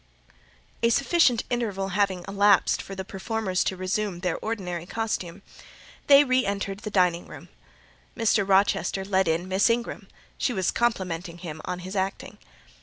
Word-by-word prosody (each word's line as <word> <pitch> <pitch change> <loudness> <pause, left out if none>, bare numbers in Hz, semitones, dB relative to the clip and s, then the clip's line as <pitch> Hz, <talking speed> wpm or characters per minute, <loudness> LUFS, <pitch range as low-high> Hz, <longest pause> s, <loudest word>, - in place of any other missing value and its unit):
A 230 - +4
sufficient 275 -1 +3
interval 205 -5 -1
having 190 -2 0
elapsed 200 0 +3
for 195 - -8
the 190 0 -5
performers 195 -1 -2
to 190 - -1
resume 185 0 -2
their 180 -3 -1
ordinary 180 -6 -4
costume, 200 -5 -3 0.6
they 280 0 +8
re 255 -2 +2
entered 200 -1 -3
the 210 - -6
dining 180 -3 +1
room. - - -12 0.7
Mr. 225 -3 +2
Rochester 195 0 +2
led 190 -2 +1
in 165 +3 0
Miss 190 +4 +3
Ingram; 235 +1 -2 0.3
she 250 - 0
was 190 -4 0
complimenting 180 -7 -1
him 160 -3 -7
on 180 0 -4
his 185 +3 -7
acting. 190 0 -3
195 Hz, 150 wpm, -26 LUFS, 185-220 Hz, 0.7 s, they